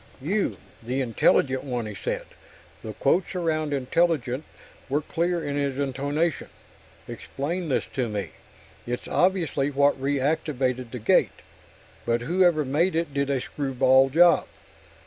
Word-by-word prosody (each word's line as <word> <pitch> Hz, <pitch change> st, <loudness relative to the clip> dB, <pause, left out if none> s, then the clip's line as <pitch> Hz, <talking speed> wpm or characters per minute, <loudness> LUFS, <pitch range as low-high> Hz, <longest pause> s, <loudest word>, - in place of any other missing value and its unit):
"You 190 Hz, +10 st, -1 dB, 0.2 s
the 125 Hz, +4 st, -3 dB
'intelligent' 130 Hz, +2 st, +2 dB
one," 125 Hz, -4 st, -3 dB
he 105 Hz, -, -6 dB
said. 100 Hz, -, -4 dB, 0.6 s
The 110 Hz, -, -6 dB
quotes 175 Hz, -, +1 dB
around 155 Hz, -4 st, -1 dB
'intelligent' 140 Hz, -1 st, 0 dB, 0.4 s
were 145 Hz, +3 st, +1 dB
clear 170 Hz, +2 st, -1 dB
in 145 Hz, 0 st, -2 dB
his 140 Hz, -2 st, -1 dB
intonation. 145 Hz, +4 st, -1 dB, 0.6 s
"Explain 165 Hz, +5 st, -4 dB
this 135 Hz, -, +1 dB
to 125 Hz, -4 st, -1 dB
me. 105 Hz, -2 st, -4 dB, 0.6 s
It's 120 Hz, 0 st, -4 dB
obviously 170 Hz, -7 st, +1 dB
what 140 Hz, -1 st, +2 dB
reactivated 135 Hz, -3 st, -1 dB
the 125 Hz, -, -6 dB
gate 110 Hz, -, +2 dB, 0.6 s
but 120 Hz, 0 st, 0 dB
whoever 170 Hz, +2 st, +2 dB
made 160 Hz, +7 st, +1 dB
it 165 Hz, -3 st, -1 dB
did 140 Hz, 0 st, 0 dB
a 140 Hz, -2 st, +1 dB
screwball 135 Hz, -1 st, +2 dB
job. 170 Hz, +5 st, +5 dB
140 Hz, 130 wpm, -25 LUFS, 130-160 Hz, 0.6 s, job